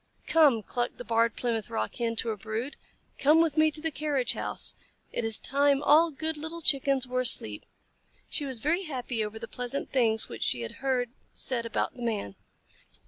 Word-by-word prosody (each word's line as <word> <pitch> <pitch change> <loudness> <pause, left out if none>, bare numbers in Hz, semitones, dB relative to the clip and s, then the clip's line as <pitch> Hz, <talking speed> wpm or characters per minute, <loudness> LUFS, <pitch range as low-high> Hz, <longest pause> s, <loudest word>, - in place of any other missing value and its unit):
"Come," 290 -9 +4
clucked 240 +3 -3
the - - -7
Barred 230 0 +2
Plymouth 230 -4 -2
Rock 110 0 -2
Hen 230 -1 -1
to 230 +1 -2
her 220 - -1
brood. 220 +6 -5 0.4
"Come 300 +4 +5
with 325 -3 +2
me 310 0 +5
to 305 0 -6
the 325 0 -1
carriage 285 -4 0
house. - - -3 0.4
It - - -2
is 225 -1 +4
time 280 +1 +2
all 315 +4 +6
good 315 +1 -4
little 320 +2 -6
Chickens 275 -2 +3
were 255 0 -2
asleep." 110 - +2 0.6
She 295 - 0
was 260 -5 -3
very 340 +6 0
happy 250 -6 -3
over 210 +1 -5
the 230 +1 -6
pleasant 250 +4 -4
things 225 -4 +2
which - - -9
she 120 - 0
had 115 - -6
heard 255 -3 0 0.2
said 235 -3 +2
about - - -1
the 245 - -12
Man. 215 - -2
255 Hz, 195 wpm, -28 LUFS, 230-295 Hz, 0.6 s, all